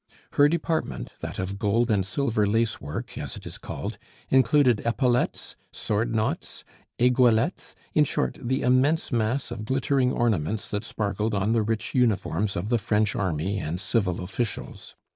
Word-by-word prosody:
Her 145 +1 +5
department, 165 - -2
that - - -6
of 95 +2 -3
gold 115 +3 +2
and 100 -3 +2
silver 110 +1 0
lace 115 +2 +1
work, 70 +2 -6
as - - -5
it - - -11
is - - -8
called, - - -6 0.3
included 130 -2 +4
epaulettes, 120 +1 0 0.2
sword 115 +2 -1
knots, 110 0 -2 0.3
aiguillettes; 125 -2 +2 0.2
in - - +5
short, 65 - -2
the 130 +3 -1
immense 130 +6 +2
mass 120 +2 0
of 115 -3 -5
glittering 130 +1 +1
ornaments 105 -4 0
that 105 +1 -2
sparkled 105 0 -2
on 100 +3 +1
the 115 - +3
rich 110 +1 -2
uniforms 105 -5 +1
of 95 +5 -3
the 120 -1 +2
French 105 0 +1
army 95 +1 -1
and 85 0 -3
civil 95 -4 0
officials. 100 +5 -5
110 Hz, 155 wpm, -26 LUFS, 100-125 Hz, 0.3 s, Her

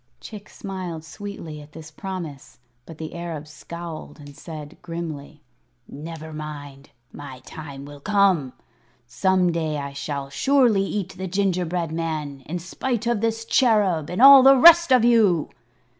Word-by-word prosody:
Chick 210 -2 -11
smiled 185 -5 -6
sweetly 165 -5 -8
at 145 +1 -16
this 160 -1 -11
promise; 170 -6 -7 0.3
but 165 - -11
the 160 0 -7
Arab 165 -3 -6
scowled 165 +2 -9
and 145 -1 -12
said, 155 -2 -10
grimly: 160 -4 -7 0.4
"Never 160 +2 -9
mind. 145 -2 -8 0.2
My 140 -3 -9
time 140 -3 -9
will 145 0 -11
come. 190 -7 +2 0.5
Some 185 +7 +1
day 160 -2 -2
I 140 -1 -5
shall 140 -1 -5
surely 250 - +3
eat 195 -2 -4
that 185 -2 -5
gingerbread 180 -4 -1
man, 155 -4 -4
in 175 +4 -3
spite 230 +7 -3
of 235 -3 0
this 225 0 -1
Cherub 210 - +2
and 180 +8 0
all 275 0 +11
the 270 +1 +7
rest 340 +2 +8
of 250 -3 +5
you." 210 -9 +3
170 Hz, 145 wpm, -23 LUFS, 150-200 Hz, 0.5 s, all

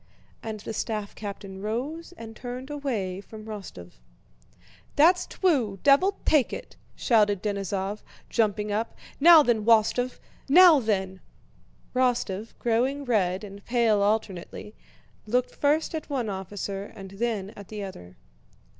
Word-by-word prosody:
And 220 -2 -6
the 225 - -6
staff 215 -1 -3
captain 195 -2 -7
rose 265 - -4
and 225 -1 -9
turned 250 +4 -7
away 220 -11 -3
from 215 +1 -11
Rostóv. 195 - -8 1.0
"That's 345 +5 +5
twue, 260 - +1
devil 370 +9 +4
take 295 -6 +3
it!" - - -8 0.2
shouted 210 -5 +2
Denísov, 200 0 -2 0.3
jumping 210 -2 0
up. 220 +3 -2 0.2
"Now 325 +1 +9
then, 235 -5 +1
Wostóv, 235 +3 +3 0.3
now 340 0 +8
then!" 190 -5 -1 0.7
Rostóv, 240 -5 0
growing 255 +5 0
red 195 -5 +1
and 200 -1 -10
pale 235 -4 +2
alternately, 205 -1 -2 0.5
looked 250 +3 0
first 300 +4 +1
at 315 -1 -5
one 255 -6 -1
officer 195 +1 -5
and 195 -1 -10
then 205 -1 -2
at 200 -3 -12
the 210 -2 -6
other. 90 - -10
220 Hz, 130 wpm, -26 LUFS, 200-255 Hz, 1.0 s, Now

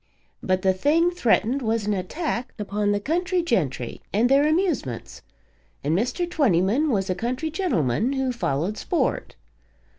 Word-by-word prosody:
But 185 0 0
the 190 -1 +4
thing 320 - +2
threatened 255 -4 +1
was 225 -2 0
an 210 - +1
attack 245 - -3
upon 205 0 -1
the 205 - +1
country 355 - 0
gentry 145 - -1
and 225 +5 +2
their 280 +2 +5
amusements, 310 - -1 0.6
and 150 +3 +1
Mr. 250 - 0
Twentyman 255 - +2
was 195 -6 0
a 185 - +1
country 255 - -3
gentleman 240 - 0
who 265 -1 0
followed 190 - -2
sport. - - -1
235 Hz, 145 wpm, -24 LUFS, 190-305 Hz, 0.6 s, their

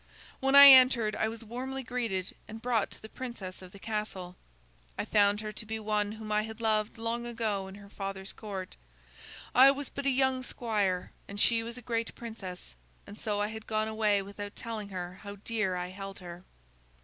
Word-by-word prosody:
When 270 +1 +2
I 280 0 +13
entered, 255 -5 +7
I 220 - +1
was 225 +1 -6
warmly 260 +4 -4
greeted 225 -7 -2
and 220 +1 -8
brought 230 -3 +1
to - - -12
the - - -7
princess 220 -7 -7
of 185 -1 -11
the 200 - -12
castle. 200 -4 -4 0.6
I - - -2
found 205 0 +3
her 215 -1 -4
to 215 - -7
be 220 +1 -4
one 210 -1 0
whom 215 -1 -7
I 210 0 +3
had 220 +1 -7
loved 215 -1 0
long 230 +1 -2
ago 220 -5 -2
in 190 - -9
her 200 0 -12
father's 195 -1 -6
court. 195 -4 -7 0.8
I 260 +2 +9
was 280 0 -1
but 280 0 -3
a - - +5
young 265 -1 +2
squire 210 -7 -1 0.2
and 200 0 -6
she 230 +2 +4
was 230 +2 -6
a 250 - -10
great 230 0 -2
princess, 195 - -8 0.3
and 205 - -10
so 210 -1 -2
I 205 - 0
had 220 0 -8
gone 215 0 0
away 215 -2 +2
without 205 +1 -8
telling 220 -3 -5
her 180 -1 -6
how 200 -1 -7
dear 205 -2 -1
I 180 0 -3
held 195 +1 -8
her. 175 -1 -10
215 Hz, 200 wpm, -30 LUFS, 200-230 Hz, 0.8 s, I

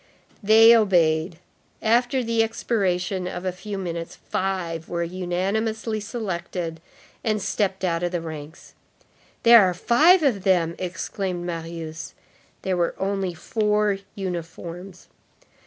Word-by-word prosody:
They 225 +2 +7
obeyed. 170 -6 +2 0.4
After 245 +3 +2
the 230 -1 +1
expiration 190 -5 -1
of 180 0 -5
a 185 - 0
few 195 +3 -7
minutes, 170 -3 -5
five 175 -4 -3
were 170 -1 -1
unanimously 195 +6 -2
selected 180 -6 -4 0.4
and 215 -1 +1
stepped 195 -1 -1
out 170 -2 0
of 175 0 -1
the 175 - -1
ranks. 155 -1 -9 0.7
"There 235 -1 +9
are 185 -2 +2
five 315 - +5
of 240 -9 +2
them!" 175 -4 +2
exclaimed 185 0 -4
Marius. 165 -2 -6 0.5
There 190 -1 0
were 170 -1 0
only 195 -2 -2
four 210 +2 0 0.2
uniforms. 180 0 -6
185 Hz, 120 wpm, -24 LUFS, 170-215 Hz, 0.7 s, There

